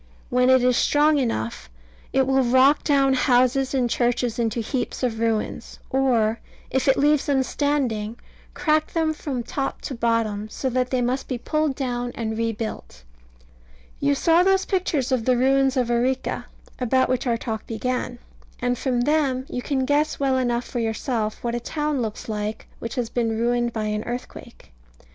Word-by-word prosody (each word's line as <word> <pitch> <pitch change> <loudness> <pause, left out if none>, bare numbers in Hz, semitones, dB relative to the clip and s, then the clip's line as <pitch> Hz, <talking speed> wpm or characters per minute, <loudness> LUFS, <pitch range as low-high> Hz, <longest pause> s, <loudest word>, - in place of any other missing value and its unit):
When 250 +1 +3
it 260 -1 +5
is 250 -1 +3
strong 295 0 +3
enough, 110 - -2 0.4
it 265 0 +3
will 265 0 +3
rock 260 +4 +4
down 275 -2 +3
houses 255 +1 +2
and 250 -2 +2
churches 240 0 0
into 230 0 0
heaps 250 +3 -3
of 225 -3 -1
ruins, 225 -2 -2
or, 235 -4 +2 0.3
if 265 0 0
it 270 - +4
leaves 295 0 +3
them 275 -2 +2
standing, 255 -7 -1 0.4
crack 310 -1 +1
them 320 -2 +1
from 275 -5 -4
top 270 +3 -3
to - - -5
bottom, 230 -3 0
so 260 +4 -3
that 250 0 0
they 255 -2 0
must 255 +3 -1
be 255 - -2
pulled 305 +3 -1
down 245 -2 -2
and 220 -1 -3
rebuilt. 220 - -4 1.0
You 140 0 +2
saw 330 - +4
those 385 +1 +3
pictures 320 -8 0
of 245 -4 +1
the 255 -1 +3
ruins 270 +1 +3
of 245 -2 +1
Arica, 255 +2 0 0.3
about 260 +1 +2
which 255 0 -1
our 235 -1 +2
talk 220 -2 -5
began; 245 +2 -2 0.4
and 245 0 -1
from 250 -3 0
them 275 -2 +1
you 250 - -3
can 265 0 -1
guess 295 +3 +1
well 270 -1 +2
enough 240 -1 0
for 245 - -4
yourself 225 -1 -2
what 235 -1 -1
a 240 - -1
town 295 +2 -2
looks 220 -2 -4
like 210 0 -4
which 230 +2 -5
has 240 -3 -2
been 225 -2 0
ruined 240 +1 +1
by 220 -1 -3
an 210 0 -2
earthquake. 240 - -8
250 Hz, 175 wpm, -23 LUFS, 230-270 Hz, 1.0 s, it